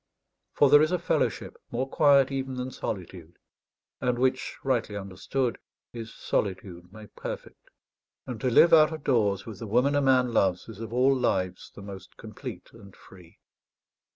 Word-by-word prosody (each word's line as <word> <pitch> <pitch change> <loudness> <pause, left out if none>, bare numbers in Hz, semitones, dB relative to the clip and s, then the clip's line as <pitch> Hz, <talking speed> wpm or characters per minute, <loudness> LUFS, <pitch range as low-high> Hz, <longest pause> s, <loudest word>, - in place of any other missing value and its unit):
For 145 - +4
there 145 - +8
is 155 +2 +2
a 180 - +2
fellowship 170 - -1
more 125 +3 -2
quiet 140 -1 +4
even 135 -1 -3
than 125 +1 -4
solitude, 90 -6 -7 0.6
and 125 -1 0
which 130 +1 0
rightly 120 -6 -1
understood, 100 +6 -3 0.3
is 115 -2 -7
solitude 95 -3 -3
made 110 0 -14
perfect. - - -8 0.6
And 120 -4 -7
to 130 - +1
live 165 +8 +6
out 155 -1 +7
of 155 -2 -7
doors 105 -7 +1
with 110 -4 -9
the 115 - -6
woman 125 +7 +2
a 145 - +2
man 130 -3 +3
loves 95 -4 +1
is 110 -3 -10
of 115 -1 -7
all 130 +3 +3
lives 95 -8 -1
the 100 - -10
most 95 -1 -11
complete 115 +2 -9
and 100 -4 -15
free. 90 -3 -17
120 Hz, 165 wpm, -27 LUFS, 100-135 Hz, 0.6 s, there